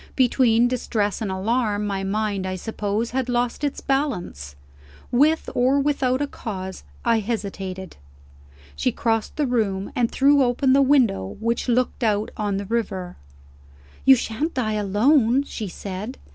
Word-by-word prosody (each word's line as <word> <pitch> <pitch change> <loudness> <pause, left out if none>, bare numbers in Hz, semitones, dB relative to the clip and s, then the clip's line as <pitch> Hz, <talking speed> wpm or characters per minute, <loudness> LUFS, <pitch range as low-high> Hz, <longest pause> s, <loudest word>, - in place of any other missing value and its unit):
Between 245 -2 +4
distress 225 -5 -1
and 215 - -2
alarm, 210 +1 0
my 195 -1 -2
mind 200 -1 -1
(I 185 - -3
suppose) 210 +3 -3
had 260 0 -1
lost 245 +3 -1
its 285 -1 -2
balance. 195 - -2 0.6
With 300 +6 +3
or 260 +3 +3
without 275 -2 +1
a - - -2
cause, 190 -7 -6 0.2
I 230 -1 +3
hesitated. 195 -4 -5 0.8
She 70 - 0
crossed 225 -2 -1
the 300 - +1
room, 210 -6 -1
and 240 -2 +2
threw 280 +1 +4
open 260 +1 +2
the 275 - +5
window 245 - +2
which 230 +3 -1
looked 250 +1 0
out 210 -1 +1
on 205 -2 -1
the 200 - -4
river. 190 -5 -3 0.9
"You 265 - +8
shan't 255 +7 -3
die 225 -4 0
alone," 225 +6 +3
she 220 -6 -6
said. 200 +7 -6
225 Hz, 145 wpm, -23 LUFS, 200-255 Hz, 0.9 s, You